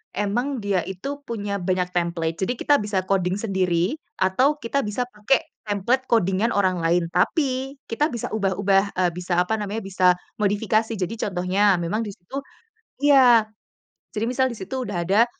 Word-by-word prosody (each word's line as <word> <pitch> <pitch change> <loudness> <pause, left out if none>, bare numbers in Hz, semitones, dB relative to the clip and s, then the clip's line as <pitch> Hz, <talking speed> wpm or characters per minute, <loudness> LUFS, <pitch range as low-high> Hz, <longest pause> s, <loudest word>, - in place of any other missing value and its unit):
memang 240 +7 -1
dia 195 -3 +1
itu 275 +10 -5
punya 205 -6 -4
banyak 180 0 0
template. 170 -1 -1
Jadi 190 +6 0
kita 290 -6 +3
bisa 200 -3 -1
coding 185 -1 +1
sendiri 185 -3 0 0.2
atau 255 +11 +2
kita 280 +1 -1
bisa 210 +4 -2
pakai 245 +5 0 0.3
template 240 +6 0
coding-an 210 0 +2
orang 185 -3 +1
lain. 170 +1 +2
Tapi 265 - 0
kita 295 +7 0
bisa 235 -6 -5
ubah 195 -4 0
ubah, 195 -1 +3
eee, 180 -1 +2
bisa 175 0 -2
apa 180 +5 +2
namanya 210 +2 -3
bisa 190 -1 -1 0.4
modifikasi. 215 +2 +1
Jadi 190 +3 -2 0.2
contohnya, 190 +2 +2
memang 175 +6 -1
disitu 210 +5 -6 0.6
iya. 255 -6 +6 0.7
Jadi 215 +1 -1
misal 260 +1 +2
disitu 245 +4 -5
sudah 175 -4 -2
ada 210 +5 +4
205 Hz, 155 wpm, -23 LUFS, 185-235 Hz, 0.7 s, iya